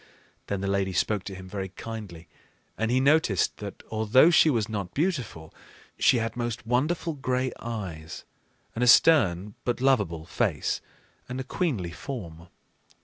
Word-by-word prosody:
Then 100 -1 -2
the 100 - -2
lady 95 -1 0
spoke 100 +2 0
to 95 - -6
him 95 0 -10
very 95 0 -5
kindly; 95 -5 -8 0.5
and 110 0 -1
he 125 +2 +3
noticed 135 - +2
that, 100 -2 -8
although 110 +9 +5
she 170 -2 +6
was 115 -7 +1
not 100 -5 -5
beautiful, 130 - -2 0.5
she 125 - +5
had 115 -1 -2
most 120 -1 -3
wonderful 150 +8 0
gray 130 -2 -1
eyes, 95 -9 -6 0.5
and 120 - -1
a - - +3
stern 105 - +5
but 120 -1 -1
lovable 105 -12 +1
face - - -1 0.5
and 125 +1 -4
a - - -2
queenly 130 - -2
form. 85 - -7
110 Hz, 150 wpm, -27 LUFS, 95-130 Hz, 0.5 s, she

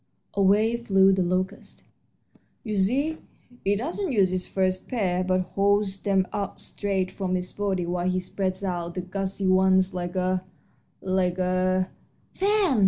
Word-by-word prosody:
Away 205 +4 +3
flew 195 -4 +4
the 190 - +1
locust. 185 +1 -2 0.8
"You 215 -3 -3
see, 265 +11 +1 0.5
he 200 +1 +2
doesn't 320 - -2
use 195 -6 +3
his 185 0 -2
first 185 -1 -1
pair, 185 -7 0
but 185 0 +1
holds 200 -1 +1
them 190 -2 +2
out 200 -2 -3
straight 190 -2 -2
from 185 -1 -2
his 180 0 -3
body 195 -3 -1
while 175 +1 -1
he 185 0 +1
spreads 185 +1 -3
out 175 -2 -3
the 180 - -2
gauzy 195 +1 -3
ones 185 0 +4
like 175 0 -4
a 185 0 0 0.6
like 185 -1 +1
a 185 0 +1 0.3
" - - -38
"Fan!" 395 - +2
190 Hz, 155 wpm, -26 LUFS, 185-200 Hz, 0.8 s, flew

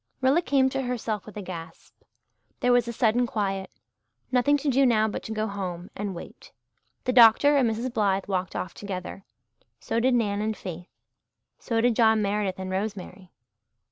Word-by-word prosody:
Rilla 270 +6 +3
came 275 -5 +2
to 270 0 -2
herself 230 -5 -3
with 210 - -10
a 205 - -5
gasp. 170 -2 -9 0.7
There 250 - +3
was 245 -1 +3
a - - -2
sudden 235 +1 +2
quiet. 195 -4 -2 0.6
Nothing 265 +3 +3
to 290 - -5
do 275 0 +3
now 220 -4 +3
but 215 - -4
to - - -8
go 215 0 -1
home 185 -4 -5
and 200 -2 -4
wait. - - -11 0.5
The 255 - 0
doctor 245 +4 +7
and 260 -5 +3
Mrs. 235 +3 -3
Blythe 195 -3 +1
walked 185 -1 -3
off 185 - -4
together 195 -1 -7 0.5
so 230 - -2
did 250 +1 +3
Nan 205 -3 0
and 215 0 -2
Faith 175 -1 -7 0.7
so 230 -2 -1
did 240 -1 +2
John 220 -1 +4
Meredith 200 -2 -1
and 190 0 -5
Rosemary. 190 -2 -5
215 Hz, 175 wpm, -26 LUFS, 195-245 Hz, 0.7 s, doctor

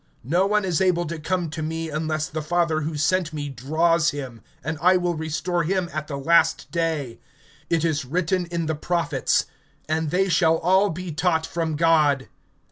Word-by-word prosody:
(44)No 180 +6 +2
one 185 -4 +1
can 165 0 -5
come 175 0 -1
to 155 - -5
me, 160 +1 -3
except 155 +1 -2
the 155 - -2
Father 165 0 +1
who 155 0 -3
sent 160 +1 +1
me 145 -1 -4
draw 155 +6 +1
him; 140 -7 -2 0.2
and 155 +2 -3
I 185 +2 +5
will 175 -1 0
raise 160 -1 -3
him 175 +1 0
up - - -13
at 155 0 -3
the 140 - -4
last 160 +3 +2
day. 160 -8 -2 0.5
(45)It 165 -1 +1
is 150 -4 0
written 180 +5 0
in 170 -1 -2
the 160 - -1
prophets: 165 -2 0 0.4
And 160 0 0
they 185 +4 +2
shall 165 -3 +3
all 190 +5 +3
be 180 +1 -5
taught 160 0 0
of 160 -3 -1
God. 150 -4 +3
165 Hz, 180 wpm, -24 LUFS, 155-175 Hz, 0.5 s, I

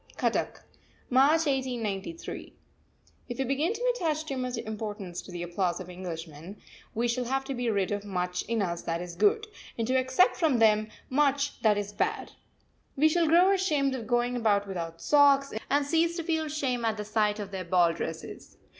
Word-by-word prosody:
CUTTACK, - - -1 0.5
March 290 +6 +5
1893. 255 - -3 0.7
If 245 - -5
we 270 - 0
begin 275 - 0
to - - 0
attach 315 -7 -1
too 275 - -4
much 255 -1 -3
importance 210 -5 -5
to - - -12
the 175 -1 -5
applause 175 0 -1
of 180 -1 -8
Englishmen, 170 0 -8 0.4
we 235 +2 +1
shall 245 +1 -1
have 270 +2 -1
to 270 0 -4
be 245 -2 -1
rid 200 -3 0
of 205 0 -2
much 180 -2 -2
in 230 -3 0
us 170 -2 -3
that 165 0 -2
is 175 0 -6
good, 425 - +3 0.3
and 230 - 0
to 255 - 0
accept 260 +7 +3
from 315 -7 +2
them 215 -1 +4 0.2
much 285 0 +1
that 215 -2 +4
is 205 0 -4
bad. - - -2 0.6
We 310 +3 +4
shall 335 +1 +2
grow 350 +4 +5
ashamed 300 -8 +1
of 235 -4 -5
going 240 +1 +1
about 205 -4 +2
without 165 -3 -5
socks, 280 -1 +4 0.2
and 285 0 +2
cease 330 +3 +1
to 335 - -3
feel 320 -1 -1
shame 270 -5 -2
at 220 -1 0
the 210 - -4
sight 210 -1 +1
of 205 -2 -6
their 190 -1 -4
ball 175 -1 +3
dresses. - - -7
240 Hz, 190 wpm, -28 LUFS, 200-285 Hz, 0.7 s, March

